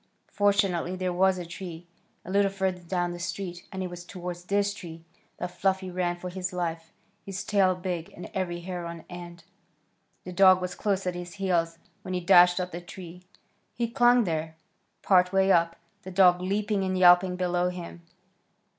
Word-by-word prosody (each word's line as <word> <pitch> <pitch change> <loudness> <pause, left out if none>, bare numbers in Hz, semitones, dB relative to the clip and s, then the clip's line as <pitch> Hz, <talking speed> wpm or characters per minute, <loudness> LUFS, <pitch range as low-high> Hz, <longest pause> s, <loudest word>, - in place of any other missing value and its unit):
Fortunately 195 -4 +1
there 185 -1 -2
was 190 +1 +3
a 175 - -5
tree 170 -1 -8 0.4
a 180 - -7
little 200 0 +3
further 190 -2 -2
down 175 0 -2
the 175 - -7
street, 175 0 -5
and 190 -1 -4
it 180 - -4
was 175 0 -8
toward 180 -1 -6
this 200 +3 0
tree 165 -5 -10 0.3
that 180 - -4
Fluffy 190 0 -1
ran 175 -1 -1
for 180 +1 -7
his 185 0 -4
life, 165 -2 -4 0.3
his 195 0 -5
tail 190 -3 +3
big, 180 -2 -4
and 175 - -7
every 175 -2 -2
hair 175 -1 -5
on 170 -1 -8
end. 175 -1 -9 0.8
The 180 - -7
dog 185 0 +6
was 180 -1 -4
close 195 +1 -1
at 180 - -1
his 175 0 -7
heels 170 -4 0 0.2
when 185 - -4
he - - 0
dashed 180 0 +6
up 180 0 -3
the 175 - -6
tree. 175 0 -10 0.5
He 235 0 -1
clung 245 -1 +5
there, 160 -3 -3 0.5
part 180 -2 +4
way 195 0 +3
up, 170 -1 +3 0.3
the 190 - -9
dog 180 -1 +5
leaping 200 +1 0
and 185 0 -1
yelping 180 0 +6
below 180 0 0
him. 175 -1 -8
180 Hz, 180 wpm, -27 LUFS, 175-190 Hz, 0.8 s, dog